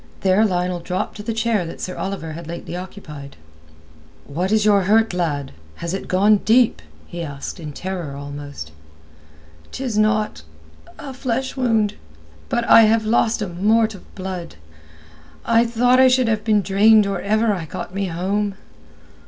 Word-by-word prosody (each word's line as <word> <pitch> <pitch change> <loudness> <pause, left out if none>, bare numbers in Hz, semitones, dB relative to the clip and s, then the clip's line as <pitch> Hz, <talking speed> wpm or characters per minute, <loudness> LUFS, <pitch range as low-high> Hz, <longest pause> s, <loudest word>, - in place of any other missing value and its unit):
There 190 +2 +3
Lionel 180 -1 -1
dropped 180 +2 -3
to - - -6
the 230 - -3
chair 225 -3 0
that 165 - -8
Sir 185 - -5
Oliver 190 -5 -4
had 165 +1 -8
lately 170 +1 -6
occupied. 155 -7 -9 0.9
"What 180 +7 -2
is 215 -1 +3
your 200 -3 +4
hurt, 220 +1 +3
lad? 150 -6 -2 0.2
Has 170 +1 -5
it 195 - -4
gone 205 +3 +4
deep?" 230 - +3 0.2
he 170 - -7
asked, 145 +2 -6
in 155 -3 -7
terror 175 -3 -5
almost. 145 - -8 1.0
"'Tis 245 -5 -2
naught—a 80 - -3
flesh 260 +1 -3
wound; 225 -5 +1 0.6
but 240 - 0
I 230 - +7
have 220 0 +2
lost 220 0 +1
a - - -3
mort 215 +5 +2
of 195 - -15
blood. 185 - -6 0.9
I 230 +1 +3
thought 245 +2 +3
I 260 - +7
should 255 -1 +3
have 220 -2 0
been 210 -2 +2
drained 205 +3 +5
or 195 -2 -2
ever 215 +2 +1
I 175 -4 -4
got 160 - -7
me 195 0 -2
home." 195 +4 -2
200 Hz, 160 wpm, -21 LUFS, 170-220 Hz, 1.0 s, I